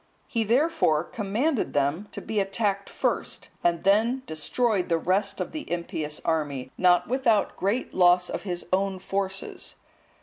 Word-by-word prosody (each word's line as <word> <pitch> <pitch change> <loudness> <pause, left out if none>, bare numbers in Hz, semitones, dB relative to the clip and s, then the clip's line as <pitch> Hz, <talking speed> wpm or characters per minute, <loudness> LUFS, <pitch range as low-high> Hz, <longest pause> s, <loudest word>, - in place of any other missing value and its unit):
He, 230 -2 -1
therefore, 240 - +2
commanded 235 - -1
them 145 +8 0
to - - -6
be 215 - -2
attacked 200 0 -1
first, - - -2
and 170 -1 +1
then 225 +6 +3
destroyed 195 - 0
the 165 - +3
rest 195 +5 0
of 185 - -3
the 310 - -7
impious 160 -3 -3
army, 145 -5 -1
not 180 -1 +4
without 235 -4 +2
great 205 +7 -1
loss 180 0 +5
of - - -4
his 175 -3 -4
own 195 0 +1
forces. 195 0 -3
195 Hz, 145 wpm, -26 LUFS, 175-220 Hz, -, loss